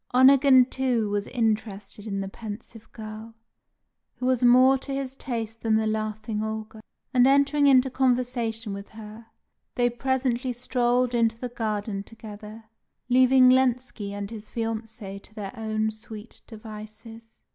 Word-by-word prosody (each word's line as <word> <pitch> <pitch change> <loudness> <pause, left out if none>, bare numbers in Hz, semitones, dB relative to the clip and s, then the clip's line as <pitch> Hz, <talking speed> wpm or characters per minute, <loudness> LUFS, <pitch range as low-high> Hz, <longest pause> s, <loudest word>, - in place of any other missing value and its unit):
Onegin, 260 0 +7
too, 245 -5 -1
was 205 0 -1
interested 215 -3 -2
in 195 -2 -2
the 195 - -4
pensive 220 +2 -9
girl, 220 0 -9 0.8
who 250 - -5
was 255 -1 +2
more 255 +2 +6
to 275 - -7
his 270 -1 -3
taste 230 -4 -5
than 220 -1 +2
the 220 0 +2
laughing 215 0 -2
Olga; 220 0 -5 0.3
and 250 0 +5
entering 280 +1 +4
into 265 -1 +6
conversation 245 -4 0
with 200 0 -8
her, 220 +1 -11 0.5
they 245 0 +2
presently 255 0 -1
strolled 245 0 +1
into 230 -1 +2
the 250 +1 -5
garden 215 -3 -3
together, 215 0 -11 0.5
leaving 255 0 +6
Lenski 255 -4 +1
and 200 +1 -5
his 215 -2 -9
fiancée 225 -3 -5
to 215 - -14
their 200 -3 -6
own 220 -1 -1
sweet 220 0 -11
devices. 220 +1 -11
225 Hz, 140 wpm, -26 LUFS, 215-250 Hz, 0.8 s, Onegin